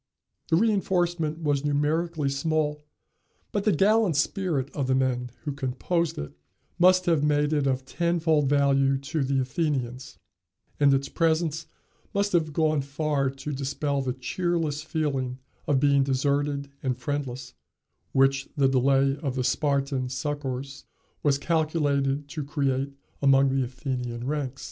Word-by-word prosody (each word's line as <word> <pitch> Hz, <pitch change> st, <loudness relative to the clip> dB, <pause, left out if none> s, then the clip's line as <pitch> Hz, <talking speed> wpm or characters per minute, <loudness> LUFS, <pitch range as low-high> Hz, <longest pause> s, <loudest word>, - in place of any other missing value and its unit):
The -, -, +4 dB
reënforcement 175 Hz, -6 st, +1 dB
was 145 Hz, -2 st, +1 dB
numerically 150 Hz, +2 st, 0 dB
small, 150 Hz, +1 st, -1 dB, 0.7 s
but 205 Hz, -1 st, -1 dB
the 215 Hz, -, +4 dB
gallant 205 Hz, -3 st, +3 dB
spirit 150 Hz, -5 st, 0 dB
of 140 Hz, -3 st, -2 dB
the 130 Hz, -, +2 dB
men 125 Hz, -2 st, 0 dB
who 150 Hz, -, -2 dB
composed 145 Hz, +5 st, -1 dB
it 75 Hz, 0 st, -6 dB, 0.5 s
must 185 Hz, +1 st, +5 dB
have 165 Hz, -5 st, +2 dB
made 150 Hz, 0 st, +2 dB
it 145 Hz, -2 st, +1 dB
of 130 Hz, -1 st, -1 dB
tenfold 160 Hz, -2 st, +1 dB
value 135 Hz, -1 st, +3 dB
to 140 Hz, +2 st, -2 dB
the 135 Hz, 0 st, +1 dB
Athenians, 130 Hz, -2 st, -2 dB, 0.6 s
and 145 Hz, -1 st, +5 dB
its 135 Hz, 0 st, +1 dB
presence 160 Hz, -1 st, 0 dB, 0.5 s
must 200 Hz, 0 st, +1 dB
have 160 Hz, -3 st, +1 dB
gone 155 Hz, -1 st, +1 dB
far 140 Hz, 0 st, -1 dB
to 135 Hz, +2 st, -6 dB
dispel 140 Hz, +1 st, -1 dB
the 130 Hz, -2 st, -2 dB
cheerless 160 Hz, +2 st, -1 dB
feeling 140 Hz, -5 st, -2 dB, 0.3 s
of 140 Hz, -2 st, +3 dB
being 140 Hz, 0 st, +4 dB
deserted 140 Hz, +1 st, 0 dB
and 130 Hz, -3 st, -1 dB
friendless, 130 Hz, 0 st, -4 dB, 0.6 s
which 135 Hz, +1 st, +2 dB
the 140 Hz, -1 st, +4 dB
delay 135 Hz, +1 st, +3 dB
of 140 Hz, -5 st, -3 dB
the 130 Hz, -, 0 dB
Spartan 135 Hz, 0 st, 0 dB
succors 135 Hz, 0 st, -4 dB, 0.4 s
was 140 Hz, -2 st, +2 dB
calculated 145 Hz, -3 st, 0 dB
to 150 Hz, 0 st, -4 dB
create 140 Hz, -1 st, -1 dB, 0.3 s
among 135 Hz, -1 st, +5 dB
the 135 Hz, 0 st, +1 dB
Athenian 125 Hz, -2 st, -4 dB
ranks. 140 Hz, -2 st, -3 dB
140 Hz, 140 wpm, -26 LUFS, 135-155 Hz, 0.7 s, must